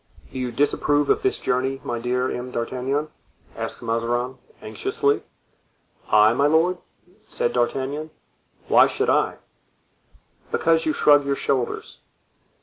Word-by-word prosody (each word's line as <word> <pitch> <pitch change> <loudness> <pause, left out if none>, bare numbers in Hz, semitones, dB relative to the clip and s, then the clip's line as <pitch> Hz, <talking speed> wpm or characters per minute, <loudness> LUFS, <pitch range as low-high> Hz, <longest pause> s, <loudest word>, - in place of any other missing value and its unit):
"Do 130 - -5
you 125 -1 -2
disapprove 145 +2 +1
of - - +1
this 390 0 +1
journey, 130 +2 -1
my 120 - -3
dear 125 +2 -1
M. 125 +1 -5
d'Artagnan?" 130 +5 -2 0.5
asked - - -5
Mazarin, 120 +3 -2 0.2
anxiously. 140 +6 -1 0.9
"I, 105 +1 +5
my 140 +4 +2
lord?" 165 +4 +2 0.4
said 120 - -2
D'Artagnan; 135 +5 -1 0.6
"why - - +6
should - - 0
I?" - - +1 1.2
"Because 165 -1 +2
you 155 - +2
shrug 145 -1 +5
your 140 0 -1
shoulders." 130 -3 -2
130 Hz, 125 wpm, -23 LUFS, 120-145 Hz, 1.2 s, why